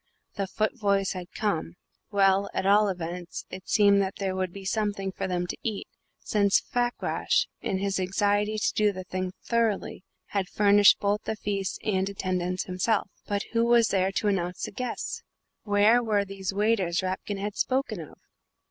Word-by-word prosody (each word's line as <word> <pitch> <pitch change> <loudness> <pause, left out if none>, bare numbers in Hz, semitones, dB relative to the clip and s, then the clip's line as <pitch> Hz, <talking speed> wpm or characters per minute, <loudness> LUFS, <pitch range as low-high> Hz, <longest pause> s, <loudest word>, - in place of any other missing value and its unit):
The 195 -2 -2
Futvoyes 200 -1 0
had 180 -2 -7
come; 175 -5 -2 0.3
well, 195 -1 +3
at - - -1
all 205 +1 +5
events, 175 -1 -5
it 185 0 -9
seemed 200 -1 +5
that 190 0 -2
there 190 -2 -2
would 185 -1 -1
be 195 +1 -9
something 200 -2 -1
for - - -4
them 180 -1 -1
to - - -5
eat, 215 -3 -3 0.3
since 200 -2 +2
Fakrash, 245 -1 0 0.2
in 190 - -1
his 195 0 -1
anxiety 205 +3 +1
to 215 - 0
do 210 -1 +3
the 185 -1 -7
thing 185 0 -3
thoroughly, 230 -5 0 0.3
had 195 -3 -1
furnished 205 -1 +5
both 205 +1 0
the 220 - -2
feast 200 -3 -3
and 190 -2 0
attendance 185 -2 -2
himself 190 +2 0 0.2
but 205 -1 -1
who 230 0 +3
was 235 -1 +4
there 190 -1 +1
to 210 - 0
announce 180 -3 -1
the - - -3
guests? 250 +5 -4 0.4
Where 210 +3 +4
were 210 -3 +1
these 195 -1 -4
waiters 195 -4 +1
Rapkin 190 +2 -3
had 205 +1 -4
spoken 255 -6 0
of? 160 - -10
200 Hz, 170 wpm, -27 LUFS, 185-210 Hz, 0.4 s, all